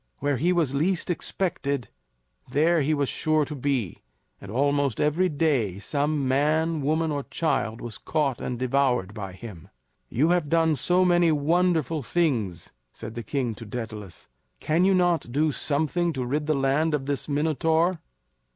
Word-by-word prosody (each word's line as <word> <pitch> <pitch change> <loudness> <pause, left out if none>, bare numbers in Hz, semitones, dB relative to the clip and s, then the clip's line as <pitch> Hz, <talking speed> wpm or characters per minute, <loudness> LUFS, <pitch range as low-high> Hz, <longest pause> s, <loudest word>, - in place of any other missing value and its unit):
Where 145 -1 0
he 170 +8 +2
was 165 -7 +1
least 170 +5 0
expected, 140 - -2 0.6
there 155 +5 +3
he 145 +2 +1
was 145 -2 +1
sure 155 +1 +1
to 150 - -7
be; 135 - -2 0.4
and 100 - -10
almost 140 0 +1
every 165 +5 +2
day 140 - 0
some 145 +5 -1
man, 155 +4 +1
woman, 155 +3 0
or 145 -1 -1
child 135 -6 -1
was 120 -2 -6
caught 145 -5 -1
and 125 - -3
devoured 125 -5 +1
by 100 -4 -6
him. 95 -4 -11 0.4
"You 150 +7 +2
have 175 -4 +1
done 165 -1 +3
so 180 +7 +3
many 175 -2 +4
wonderful 160 0 +1
things," 115 - -1 0.2
said 110 - -8
the 120 - -5
king 120 +1 -2
to 110 - -10
Daedalus, 105 -5 -7 0.3
"can 165 +4 +2
you 195 0 +4
not 175 -8 +1
do 150 +4 +2
something 160 +5 0
to 130 -3 -3
rid 145 +4 -2
the 155 - +2
land 140 +4 +1
of 135 -2 -4
this 140 +1 -3
Minotaur?" 160 +4 +1
145 Hz, 160 wpm, -25 LUFS, 125-160 Hz, 0.6 s, many